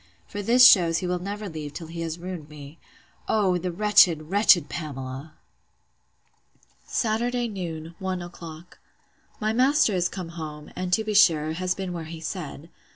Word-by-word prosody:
for 205 - -6
this 245 +5 +7
shews 170 -4 +5
he 185 - -3
will 180 0 -1
never 205 +3 -5
leave 155 -4 -7
till 165 - -7
he 165 +1 -7
has 165 0 -4
ruined 175 -4 -7
me—O, 165 +6 -4
the 180 0 -3
wretched, 175 -5 +4
wretched 195 -6 +5
Pamela! 140 -2 -7 1.5
Saturday 240 +2 0
noon, 170 -6 -6
one 185 -2 -3
o'clock. 170 -1 -11 0.6
My 215 0 0
master 255 -1 +3
is 180 -1 +1
come 180 -4 -6
home; 155 -3 -8
and, 185 0 -4
to 220 +5 +2
be 215 0 -3
sure, 155 -6 +4
has 180 +2 -2
been 190 -2 -5
where 165 -2 -5
he 160 +1 -8
said. 160 -2 -7
175 Hz, 155 wpm, -25 LUFS, 160-200 Hz, 1.5 s, this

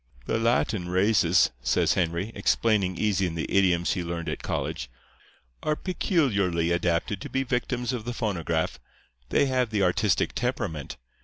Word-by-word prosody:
"'The - - 0
Latin 115 -5 +1
races,' 95 -2 +3
says 80 +7 +2
Henry, 85 +4 -1
explaining 100 -6 +1
easy 100 -3 +1
in 85 - -5
the 85 - -3
idioms 90 -3 +3
he 90 - -2
learned 85 -1 -4
at - - -4
college, - - -3 0.7
'are 155 - 0
peculiarly 100 - 0
adapted 85 +3 0
to - - -6
be 135 - 0
victims 125 -1 -1
of 120 -3 -3
the 120 - -4
phonograph. 85 -9 -2 0.5
They - - +3
have 130 -3 +1
the 105 -3 0
artistic 90 +1 +2
temperament. 70 -5 -3
95 Hz, 150 wpm, -26 LUFS, 85-115 Hz, 0.7 s, races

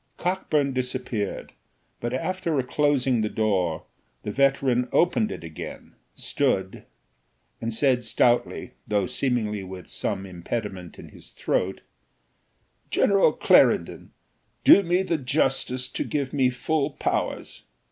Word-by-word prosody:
Cockburn 155 -6 0
disappeared, 125 -5 -3 0.5
but 120 - -3
after 165 +2 -1
closing 135 -3 +1
the 105 - 0
door 95 -8 0 0.4
the 105 - -3
veteran 135 -1 +2
opened 205 +5 +2
it - - -7
again, 80 -2 -8 0.2
stood, 95 0 -1 0.8
and 115 - -2
said 125 +1 +2
stoutly, 120 0 +1 0.2
though 105 -2 +1
seemingly 110 -4 -1
with 95 -1 -9
some 95 - -3
impediment 95 0 -5
in - - -11
his - - -13
throat 95 +1 -1 1.1
"General 200 -1 +4
Clarendon, - - +3 0.5
do - - +8
me 180 0 +1
the 170 -4 -1
justice 130 -2 0
to - - -2
give 140 -3 -3
me 135 -3 +3
full 140 +3 -1
powers." 140 - -3
125 Hz, 115 wpm, -25 LUFS, 105-145 Hz, 1.1 s, do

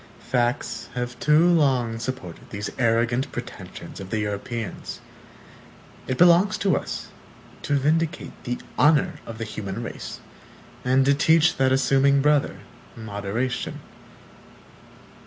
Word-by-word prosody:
(1) - - -20
Facts 120 +1 -1
have 125 0 -4
too 150 +3 +5
long 130 -9 +2
supported 115 -8 -6
these 100 0 -5
arrogant 120 +2 +1
pretensions - - -8
of 95 -1 -8
the 110 - -1
Europeans. 105 +1 -4 1.1
It 130 - -1
belongs 180 +4 +5
to 200 -3 +2
us - - -4 0.5
to 145 - 0
vindicate 160 +5 0
the 125 -1 -2 0.2
honor 150 -1 +4
of 115 - -7
the 115 - -4
human 105 0 -5
race, - - -7 0.6
and 130 +1 +3
to 140 - +5
teach 160 +3 +4
that 130 0 +3
assuming 135 +1 +4
brother, 145 -10 +2 0.3
moderation. 110 +3 -3
130 Hz, 120 wpm, -24 LUFS, 115-150 Hz, 1.1 s, too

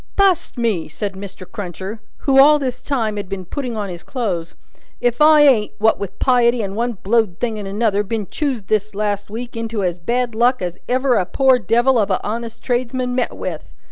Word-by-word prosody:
B 395 - +4
u 395 - +7
u - - +6
ust 345 - -6
me!" 215 -9 0
said 200 +6 -4
Mr. 195 -1 -9
Cruncher, 190 +3 -6 0.2
who 270 -1 +5
all 300 +2 +8
this 260 -4 -3
time 225 -7 -1
had 200 -2 -5
been 195 -2 -5
putting 245 +3 -4
on 205 -1 -2
his 175 -1 -7
clothes, 195 -11 -3 0.4
"if 245 +2 0
I 305 0 +7
ain't, 250 -8 +4
what 220 +1 +3
with 195 -1 -6
piety 240 -2 +3
and 195 0 -4
one 240 +2 -1
blowed 210 -2 0
thing 225 -3 -2
and 200 - -6
another, 205 0 +1
been 210 +1 -3
choused 255 -5 -3
this 215 0 0
last 205 -1 -2
week 235 +3 -6
into 230 -2 -3
as 175 -1 -1
bad 240 +6 -1
luck 245 +3 +2
as 180 -1 -4
ever 255 -1 +2
a 185 - +1
poor 265 -2 +3
devil 240 +4 +3
of 205 - +1
a - - +1
honest 230 +1 -5
tradesman 250 0 -1
met 250 -1 -1
with! 165 -4 -6
225 Hz, 215 wpm, -19 LUFS, 200-250 Hz, 0.4 s, all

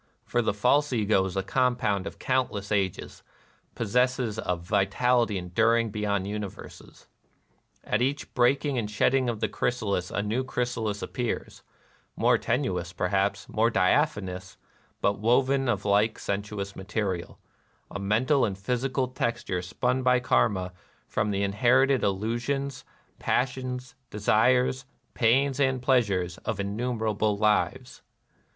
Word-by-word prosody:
For 120 - +1
the 115 - +1
false 140 +7 +2
Ego 105 -5 +2
is 95 0 -4
a 95 - 0
compound 120 -3 0
of - - -8
countless 125 -6 -1
ages, 95 -3 -2 0.3
— - - -37
possesses 125 0 0
a 90 - 0
vitality 100 +5 +1
enduring 115 +5 +1
beyond 100 -2 -1
universes. 105 -1 -8 0.8
At 105 - 0
each 140 +3 -1
breaking 130 +2 +2
and 105 -2 -3
shedding 125 +5 +2
of 115 -2 -4
the - - +2
chrysalis 100 -7 -1
a 105 - -2
new 110 +5 -1
chrysalis 120 -5 -2
appears, 120 -2 -4 0.3
— - - -33
more - - +3
tenous, - - -1
perhaps, - - 0
more - - +2
diaphanous, 90 -2 0 0.4
but 100 0 +1
woven 130 +4 +2
of 100 -4 -1
like 105 +2 +2
sensuous 100 0 -4
material, 95 -3 -3 0.3
— - - -37
a - - -2
mental 120 +8 +2
and 100 -3 -1
physical 130 +5 -1
texture 120 -7 -2
spun 125 +8 -1
by 125 0 +3
Karma 95 -7 +1 0.3
from 105 0 -1
the 100 -1 0
in 100 0 -1
herited 130 +4 +4
illusions, 120 +7 -2 0.4
passions, 125 0 -2 0.2
desires, 125 +5 +2 0.3
pains 135 +3 +2
and 130 -2 +2
pleasures, 100 -9 +1
of 110 -2 -4
innumerable 110 0 -1
lives. 105 0 0
110 Hz, 130 wpm, -27 LUFS, 100-125 Hz, 0.8 s, herited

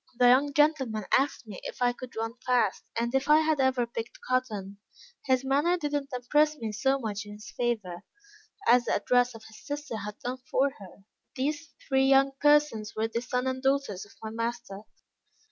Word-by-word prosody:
The 245 -1 +6
young 275 +3 +4
gentleman 270 -9 +2
asked 270 -2 0
me 210 -4 -9
if - - -8
I 245 -1 +2
could 250 0 -10
run 225 +1 -3
fast, 245 -6 +1 0.2
and 235 +1 -1
if 270 +2 0
I 305 +1 +7
had 315 -2 +1
ever 260 -2 +2
picked 230 0 -7
cotton. 210 -6 -2 0.5
His 260 0 +2
manner 290 +7 +2
did 295 -4 -3
not 290 -1 -1
impress 295 +5 +2
me 225 -4 -4
so 265 +6 +1
much 210 -5 -4
in 205 0 -10
his 215 +2 -11
favor, 215 -8 -2 0.7
as 245 0 +5
the - - +1
address 245 -1 +2
of 220 - -11
his 220 - -15
sister 290 -5 -5
had 210 0 -6
done 250 +1 -5
for 275 +1 +2
her. 195 0 -13 0.3
These 295 +4 -3
three 265 -1 +3
young 275 0 +5
persons 295 -7 +3
were 220 +1 -1
the 230 +1 -2
son 250 +1 -2
and 260 0 -2
daughters 270 -8 0
of 205 - -17
my 220 - -5
master. 230 -3 -4
250 Hz, 195 wpm, -28 LUFS, 220-275 Hz, 0.7 s, I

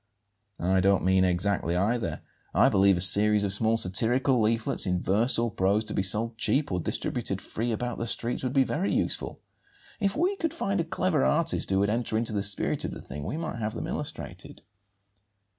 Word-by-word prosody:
"I 95 +2 +1
don't 95 +1 +2
mean 95 0 +3
exactly 90 -1 0
either. 100 -3 -1 0.3
I - - +5
believe 95 -1 +3
a - - -2
series 105 +3 +5
of 100 -1 +3
small 110 +2 +4
satirical 120 +6 +2
leaflets, 110 -2 0
in 90 -1 0
verse 105 +8 +3
or 115 -1 -1
prose, 100 +3 0
to - - -6
be - - 0
sold 110 +4 0
cheap 140 +3 0
or 90 - -1
distributed - - -3
free 115 +2 -4
about 120 +2 -4
the 115 - -3
streets, 120 +2 -1
would 130 - -2
be 135 0 +3
very 175 +9 -2
useful. - - -2 0.6
If 200 -1 -1
we 365 +6 0
could 330 -3 -3
find 200 - -1
a - - -4
clever 165 -3 -1
artist 165 +2 +1
who 95 - +1
would 100 +1 +1
enter 115 -1 -1
into 115 -1 -2
the 100 - -1
spirit 100 0 -1
of - - -3
the - - -9
thing, 70 +1 -8
we 145 - -4
might 160 -8 -5
have 110 -1 -4
them - - -5
illustrated." - - -7
110 Hz, 200 wpm, -26 LUFS, 95-125 Hz, 0.6 s, I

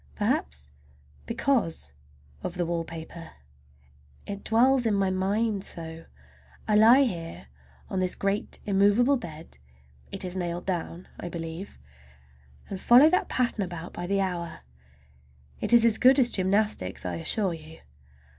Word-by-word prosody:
Perhaps 70 0 -2 0.6
because 230 - -1 0.5
of 175 - -5
the 175 -1 -1
wallpaper. 165 0 -6 0.9
It 200 0 -6
dwells 245 +2 +3
in 210 - +2
my 195 -1 +1
mind 200 +2 0
so! 165 -2 -8 0.6
I 210 - +2
lie 230 +6 +7
here 165 - -5 0.4
on 190 - -3
this 185 -1 0
great 200 +1 -2
immovable 205 +7 +3
bed—it 65 - -10
is 180 0 -4
nailed 175 -1 -3
down, 180 -1 -4
I 175 - -5
believe—and 70 - -10
follow 265 +6 +7
that 365 - +1
pattern 240 -4 0
about 175 -1 -7
by 175 - -5
the 195 +1 +1
hour. 175 -3 -4 1.0
It - - -2
is 235 -1 +6
as 225 -2 +4
good 260 +2 +6
as 245 -3 +4
gymnastics, 190 - 0
I 90 -2 -3
assure 190 - 0
you. 160 0 -11
180 Hz, 130 wpm, -27 LUFS, 160-215 Hz, 1.0 s, lie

